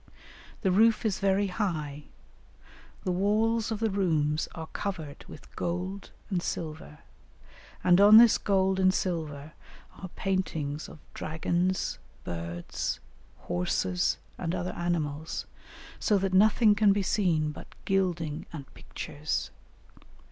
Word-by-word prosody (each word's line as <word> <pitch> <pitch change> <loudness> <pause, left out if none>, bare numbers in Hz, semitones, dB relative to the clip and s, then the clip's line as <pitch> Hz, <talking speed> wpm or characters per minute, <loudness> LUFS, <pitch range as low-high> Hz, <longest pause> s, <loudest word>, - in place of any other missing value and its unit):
The 190 - +2
roof 225 +4 +4
is 205 -3 0
very 195 +1 +2
high, 155 -8 -3 1.0
the 185 - 0
walls 215 +4 +1
of 220 -2 -2
the 225 -1 0
rooms 160 -6 +1
are 160 - -5
covered 160 -5 -5
with - - -13
gold 185 +3 -3 0.2
and 180 -2 +1
silver, 155 -3 -5 0.8
and 180 +1 +5
on 210 +2 +9
this 235 -1 +7
gold 190 -1 +2
and 185 0 +5
silver 155 -5 -3 0.5
are 185 - -7
paintings 160 -6 -2
of - - -11 0.2
dragons, 175 +4 -1 0.2
birds, 85 0 -4 0.4
horses, 90 0 0 0.2
and 165 +2 -2
other 180 0 -3
animals, 160 -3 -2 0.5
so 210 - +3
that 195 -1 -1
nothing 215 +2 +5
can 205 -1 +4
be 200 0 0
seen 170 -7 +1
but - - -10 0.2
gilding 175 -6 -1
and 140 -5 -9
pictures. 150 +2 -4
180 Hz, 120 wpm, -28 LUFS, 155-195 Hz, 1.0 s, on